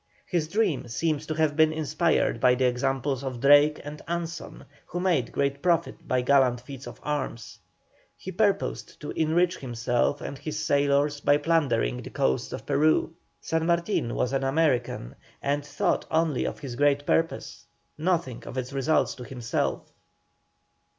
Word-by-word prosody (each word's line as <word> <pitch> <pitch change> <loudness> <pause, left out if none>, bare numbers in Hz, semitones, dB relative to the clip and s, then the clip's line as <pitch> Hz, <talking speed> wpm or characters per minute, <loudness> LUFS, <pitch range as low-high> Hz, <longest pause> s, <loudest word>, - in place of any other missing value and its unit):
His 170 -4 -1
dream 160 - 0
seems 150 +6 -1
to 155 - -2
have 155 -2 +1
been 155 0 +4
inspired 155 -3 +1
by 125 +1 +5
the 130 +1 +1
examples 135 +2 0
of 130 -3 -4
Drake 145 +3 +6
and 150 +1 -8
Anson, 170 -1 -5 0.2
who 175 - -4
made 170 -10 +1
great 140 0 -1
profit 170 -2 0
by 130 0 +1
gallant 130 -2 +4
feats 130 +2 -10
of - - -10
arms; 140 -6 -4 0.6
he 190 - -7
purposed 200 +1 -1
to 150 - -5
enrich 170 +3 +1
himself 120 +2 -1
and 140 - -6
his 155 -1 -5
sailors 145 0 +2
by 145 0 +4
plundering 145 - +1
the - - -8
coasts 65 0 0
of - - -6
Peru. 155 +2 +2 0.3
San 160 0 -1
Martin 170 - 0
was 125 - 0
an 135 0 0
American, 135 - 0 0.3
and 145 +1 -1
thought 145 0 -1
only 160 -4 +1
of - - -3
his 130 -4 -6
great 145 +1 +2
purpose, 165 0 -1 0.3
nothing 160 -6 -1
of 130 - -7
its 130 +1 -4
results 140 +3 +1
to 125 - -9
himself. 115 - -3
145 Hz, 155 wpm, -26 LUFS, 130-160 Hz, 0.6 s, Drake